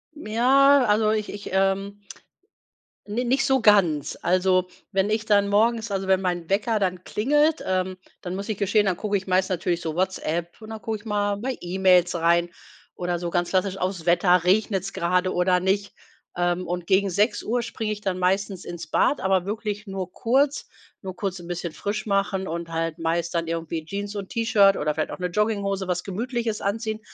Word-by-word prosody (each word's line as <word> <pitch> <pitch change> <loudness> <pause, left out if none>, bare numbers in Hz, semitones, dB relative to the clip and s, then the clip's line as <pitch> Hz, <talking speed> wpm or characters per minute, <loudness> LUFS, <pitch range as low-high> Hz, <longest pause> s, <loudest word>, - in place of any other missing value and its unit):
Ja, 275 +2 +4
also, 215 0 +3
ich 215 -1 -1
ich, 205 0 -7
ähm 195 +1 0 1.1
ni 235 +4 -1
nicht 260 +3 +1
so 265 -1 +2
ganz. 185 -10 +3
Also, 185 +1 +2 0.2
wenn 195 +1 +1
ich 215 0 0
dann 200 -2 +3
morgens 225 +2 +2
also, 195 -1 -2
wenn 190 - +4
mein 175 -3 -2
Wecker 215 +3 +1
dann 185 -2 -1
klingelt, 295 +7 +1
ähm, 185 0 -1 0.2
dann 180 0 -5
muss 200 +3 -5
ich 215 - -2
gestehen, 205 +1 +2
dann 185 -3 0
gucke 205 +1 -2
ich 190 -1 -2
meist 185 0 +2
natürlich 175 -1 -1
so 160 -2 -4
WhatsApp 175 0 -2
und 215 - -10
dann 220 -1 -7
gucke 220 -1 -3
ich 215 - -20
mal 205 -1 0
bei 255 +5 -3
E-Mails 180 0 +3
rein 170 +1 +2 0.5
oder 175 -1 -2
so 170 0 -4
ganz 175 0 0
klassisch 190 0 0
auf's 185 -3 -3
Wetter. 175 0 +4
Regnet's 195 0 +1
gerade 180 +2 0
oder 180 0 +2
nicht? 200 +2 0 0.4
Ähm, 175 +1 0
und 175 0 -3
gegen 195 +2 +2
6:00 210 +5 0
springe 220 -2 -3
ich 210 - -9
dann 190 -3 -2
meistens 190 +1 0
ins 175 -3 -7
Bad, 280 - +2
aber 190 -1 +1
wirklich 210 0 -4
nur 190 -2 -5
kurz. 270 +7 +1 0.3
Nur 185 -2 -7
kurz 190 -1 -3
'n 170 - -11
bisschen 175 -1 -4
frisch 205 +7 -4
machen 195 -1 0
und 170 0 -4
halt 165 0 -2
meist 165 +1 -1
dann 165 -1 -1
irgendwie 165 -1 -4
Jeans 200 +4 -5
und 195 -2 -5
T-Shirt 205 -4 +4
oder 150 0 -1
vielleicht 155 +1 -2
auch - - -6
'ne 180 - -1
Jogginghose, 200 -1 -1
was 180 0 -1
Gemütliches 230 +2 -3
anziehen, 220 +2 -2
195 Hz, 190 wpm, -24 LUFS, 180-210 Hz, 1.1 s, Ja